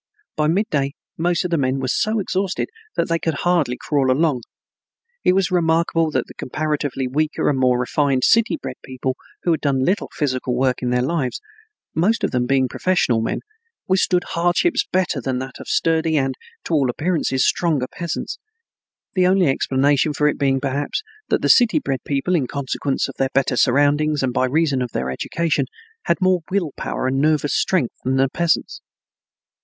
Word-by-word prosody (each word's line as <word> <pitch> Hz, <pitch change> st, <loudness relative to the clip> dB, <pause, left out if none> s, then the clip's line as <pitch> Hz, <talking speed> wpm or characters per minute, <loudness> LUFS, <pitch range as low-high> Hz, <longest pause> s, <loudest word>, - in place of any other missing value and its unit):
By 150 Hz, 0 st, +1 dB
midday 150 Hz, -6 st, 0 dB, 0.2 s
most 175 Hz, +1 st, 0 dB
of 180 Hz, -, -3 dB
the 165 Hz, -, +2 dB
men 130 Hz, 0 st, 0 dB
were 130 Hz, -, -2 dB
so 215 Hz, -, +1 dB
exhausted 195 Hz, -1 st, -1 dB, 0.3 s
that -, -, 0 dB
they 165 Hz, 0 st, 0 dB
could 160 Hz, -2 st, -1 dB
hardly 165 Hz, -9 st, +1 dB
crawl 140 Hz, -3 st, 0 dB
along. 140 Hz, -1 st, +2 dB, 0.8 s
It -, -, +4 dB
was 190 Hz, -1 st, +1 dB
remarkable 165 Hz, -1 st, +2 dB
that 130 Hz, -5 st, -1 dB
the -, -, -13 dB
comparatively 145 Hz, -2 st, -2 dB
weaker 150 Hz, +4 st, -1 dB
and 135 Hz, -3 st, +1 dB
more 125 Hz, -1 st, +3 dB
refined 135 Hz, +1 st, +1 dB
city 230 Hz, +6 st, +4 dB
bred -, -, -6 dB
people 130 Hz, 0 st, -3 dB, 0.3 s
who 175 Hz, -, +2 dB
had 160 Hz, -, 0 dB
done 135 Hz, -2 st, +1 dB
little 190 Hz, +3 st, 0 dB
physical 130 Hz, -4 st, -1 dB
work 130 Hz, 0 st, +1 dB
in 125 Hz, -, -1 dB
their 125 Hz, 0 st, +1 dB
lives, 135 Hz, -3 st, -1 dB, 0.5 s
most 205 Hz, +8 st, +1 dB
of -, -, +1 dB
them 125 Hz, -1 st, 0 dB
being 135 Hz, 0 st, +2 dB
professional 125 Hz, -7 st, +1 dB
men, 115 Hz, -, -2 dB, 0.5 s
withstood 185 Hz, -1 st, +2 dB
hardships 175 Hz, -, +2 dB
better 180 Hz, -6 st, 0 dB
than 130 Hz, +1 st, -2 dB
the 130 Hz, +1 st, -5 dB, 0.2 s
sturdy 160 Hz, -1 st, +1 dB
and, 135 Hz, -1 st, +1 dB, 0.3 s
to -, -, -4 dB
all 140 Hz, -5 st, +3 dB
appearances, 150 Hz, -1 st, 0 dB
stronger 155 Hz, -7 st, +1 dB
peasants; 170 Hz, -1 st, -5 dB, 0.7 s
the 185 Hz, -2 st, +3 dB
only 190 Hz, 0 st, +4 dB
explanation 140 Hz, +2 st, +2 dB
for 150 Hz, +1 st, +2 dB
it 150 Hz, -, 0 dB
being 135 Hz, -1 st, +2 dB
perhaps 140 Hz, -, -2 dB, 0.3 s
that -, -, +1 dB
the. -, -, +3 dB
city 240 Hz, +1 st, +5 dB
bred 135 Hz, -, -2 dB
people, 140 Hz, +6 st, -1 dB
in 145 Hz, -8 st, +1 dB
consequence 140 Hz, 0 st, -2 dB
of -, -, -8 dB
their 135 Hz, -, +1 dB
better 135 Hz, -1 st, +2 dB
surroundings 145 Hz, +3 st, +2 dB
and 125 Hz, -2 st, 0 dB
by 130 Hz, -, +2 dB
reason 140 Hz, -1 st, +1 dB
of 125 Hz, -2 st, -4 dB
their 65 Hz, 0 st, -2 dB
education, 150 Hz, -, -1 dB, 0.4 s
had 170 Hz, -, +2 dB
more 185 Hz, -1 st, +3 dB
will 185 Hz, -6 st, 0 dB
power -, -, -3 dB
and 135 Hz, +1 st, +1 dB
nervous 150 Hz, -1 st, +2 dB
strength 170 Hz, -11 st, +1 dB
than 130 Hz, +1 st, 0 dB
the 135 Hz, 0 st, +3 dB
peasants. 170 Hz, +4 st, -1 dB
145 Hz, 180 wpm, -21 LUFS, 130-170 Hz, 0.8 s, city